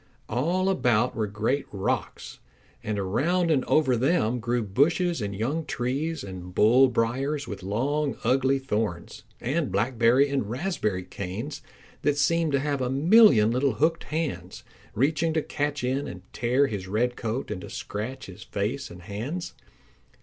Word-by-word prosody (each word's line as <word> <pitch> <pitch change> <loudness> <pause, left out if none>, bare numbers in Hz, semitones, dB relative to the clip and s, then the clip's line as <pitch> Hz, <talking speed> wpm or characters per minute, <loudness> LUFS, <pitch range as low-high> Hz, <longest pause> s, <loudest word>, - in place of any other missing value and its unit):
All 170 - 0
about 125 - +2
were 110 -1 -1
great 110 +7 -1
rocks, 95 -1 -3 0.4
and 105 -1 -2
around 165 - +1
and 135 -4 +2
over 140 -5 +3
them 125 -2 +1
grew 120 0 -1
bushes 155 - +1
and 100 -1 -3
young 135 +11 -1
trees 145 +4 -2
and 90 -2 -8
bull 125 +5 +6
briars 130 +4 -1
with 100 -4 -6
long 135 +9 -1
ugly 135 +1 +3
thorns, 110 -9 -3 0.2
and 140 - -1
blackberry 115 +6 +3
and 135 -7 -2
raspberry 120 - -2
canes 100 +10 -6 0.4
that 145 0 +1
seemed 165 +1 +2
to 140 - +3
have 140 -1 -1
a 125 - 0
million 140 - +6
little 130 +1 +1
hooked 160 +9 +1
hands, 160 -1 -4 0.3
reaching 155 +6 +1
to 160 - +1
catch 145 -1 -2
in 130 +3 -1
and 90 0 -8
tear 125 +4 +2
his 100 -7 -4
red 120 +5 0
coat 115 +1 -3
and 95 -3 -4
to - - -9
scratch 110 +6 -5
his 90 -2 -11
face 120 +7 -3
and 90 0 -12
hands. 120 - -5
125 Hz, 155 wpm, -26 LUFS, 105-145 Hz, 0.4 s, bull